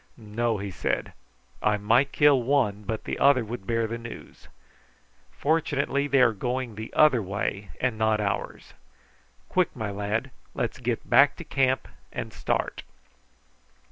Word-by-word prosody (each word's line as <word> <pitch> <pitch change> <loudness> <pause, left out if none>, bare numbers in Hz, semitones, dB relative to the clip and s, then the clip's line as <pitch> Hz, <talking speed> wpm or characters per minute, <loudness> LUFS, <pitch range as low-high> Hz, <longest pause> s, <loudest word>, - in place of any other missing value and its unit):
"No!" 115 0 -1
he 100 0 -5
said. - - -2 0.5
"I 105 0 +2
might 115 +7 +3
kill 145 -3 +5
one, 115 -6 +1
but 110 0 -3
the - - -4
other 135 -4 +5
would 110 -3 -7
bear 115 -1 +1
the 115 +1 -4
news. 115 0 -11 0.8
Fortunately 145 -2 0
they 140 -2 +4
are 115 -2 +4
going 125 +3 -3
the 110 +2 -7
other 150 -6 +5
way 100 0 -3
and 125 -4 -1
not 110 -1 +2
ours. 100 -2 -3 0.7
Quick, 180 -2 +1
my 110 -4 -3
lad! 105 +6 -2 0.2
let's 120 +1 -2
get 120 -2 -2
back 145 +1 +6
to - - -8
camp 130 -2 +1 0.2
and - - -5
start." - - -2
115 Hz, 145 wpm, -26 LUFS, 105-135 Hz, 0.8 s, back